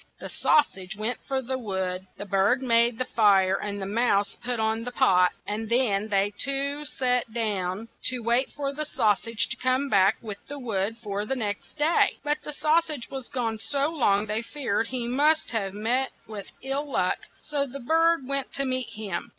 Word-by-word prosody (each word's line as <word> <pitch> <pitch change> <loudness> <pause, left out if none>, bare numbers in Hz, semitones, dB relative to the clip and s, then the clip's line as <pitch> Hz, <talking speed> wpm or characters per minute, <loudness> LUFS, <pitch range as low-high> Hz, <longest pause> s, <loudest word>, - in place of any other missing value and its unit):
The - - -7
sau 300 - +4
sage 195 -6 -9
went 220 +4 -2
for 265 -1 -1
the 260 +1 -3
wood; 190 -4 -3
the 205 - -6
bird 200 +7 +2
made 235 -1 +4
the 255 - -1
fire; 195 -5 +4
the 200 -1 -3
mouse 205 -1 +1
put 245 -1 -2
on 220 +1 0
the 245 - -5
pot, 180 -6 +4
and 215 +1 -4
then 220 -4 +2
they 200 0 +1
two 280 +2 0
sat 250 -4 0
down 210 -2 -2 0.2
to 250 -2 +1
wait 235 +3 +2
for 280 -1 -3
the 305 +2 -1
sau 220 -7 +2
sage 225 +1 -1
to - - -2
come 255 +2 +1
back 195 0 +4
with 210 -3 -7
wood 225 -6 -2
for 205 -1 -2
the 270 +5 -2
next 210 +2 -4
day. 310 +3 +3
But 295 0 0
the - - -6
sau 305 +2 +3
sage 300 -7 -6
was 265 -2 -6
gone 230 -4 -2
so 280 +5 0
long 215 -10 +2
they 215 +1 -1
feared 235 -4 -2
he 245 -1 -2
must 295 +6 +3
have 200 -4 -2
met 245 +5 0
with 210 -2 -8
ill 275 +2 -2
luck, 185 -8 +1 0.2
so 285 -2 -1
the 275 +2 -8
bird 325 +1 +2
went 275 -1 -1
to 275 - 0
meet 255 -1 -1
him. 210 -5 -4
235 Hz, 195 wpm, -26 LUFS, 205-270 Hz, 0.2 s, sau